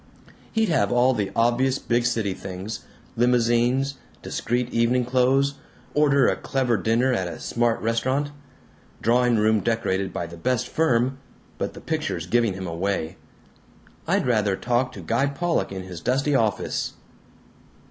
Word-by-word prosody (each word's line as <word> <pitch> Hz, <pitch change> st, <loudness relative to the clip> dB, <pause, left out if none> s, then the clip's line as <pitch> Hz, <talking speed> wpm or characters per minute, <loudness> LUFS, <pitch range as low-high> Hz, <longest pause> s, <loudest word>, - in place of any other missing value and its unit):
He'd 225 Hz, -2 st, +1 dB
have 130 Hz, -11 st, +2 dB
all 125 Hz, +2 st, +4 dB
the 105 Hz, -5 st, -1 dB
obvious 120 Hz, +3 st, +2 dB
big 120 Hz, -2 st, 0 dB
city 110 Hz, -5 st, 0 dB
things. 95 Hz, +4 st, -7 dB, 0.3 s
Limousines. 125 Hz, +3 st, +2 dB, 0.2 s
Discreet 120 Hz, +1 st, -2 dB
evening 120 Hz, +2 st, +2 dB
clothes. 130 Hz, +3 st, +2 dB, 0.4 s
Order 140 Hz, -2 st, +4 dB
a -, -, +2 dB
clever 130 Hz, -4 st, 0 dB
dinner 115 Hz, +6 st, +2 dB
at 95 Hz, -6 st, -1 dB
a 85 Hz, -, -7 dB
smart 120 Hz, -1 st, 0 dB
restaurant. 130 Hz, +6 st, 0 dB, 0.7 s
Drawing 120 Hz, +1 st, +3 dB
room 110 Hz, 0 st, +3 dB
decorated 100 Hz, -3 st, -1 dB
by 85 Hz, -, -3 dB
the 85 Hz, 0 st, -10 dB
best 125 Hz, +6 st, 0 dB
firm 130 Hz, -4 st, +1 dB, 0.4 s
but -, -, -3 dB
the -, -, -10 dB
pictures 155 Hz, -, -2 dB
giving 115 Hz, +2 st, +2 dB
him 95 Hz, 0 st, -5 dB
away. 85 Hz, -1 st, -2 dB, 0.9 s
I'd -, -, +2 dB
rather 105 Hz, -5 st, +2 dB
talk 125 Hz, +4 st, 0 dB
to -, -, -8 dB
Guy 120 Hz, +5 st, +1 dB
Pollock 165 Hz, -, -1 dB
in 95 Hz, -1 st, -5 dB
his 90 Hz, -2 st, -8 dB
dusty 135 Hz, +4 st, +1 dB
office. 110 Hz, -6 st, 0 dB
120 Hz, 145 wpm, -24 LUFS, 105-130 Hz, 0.9 s, all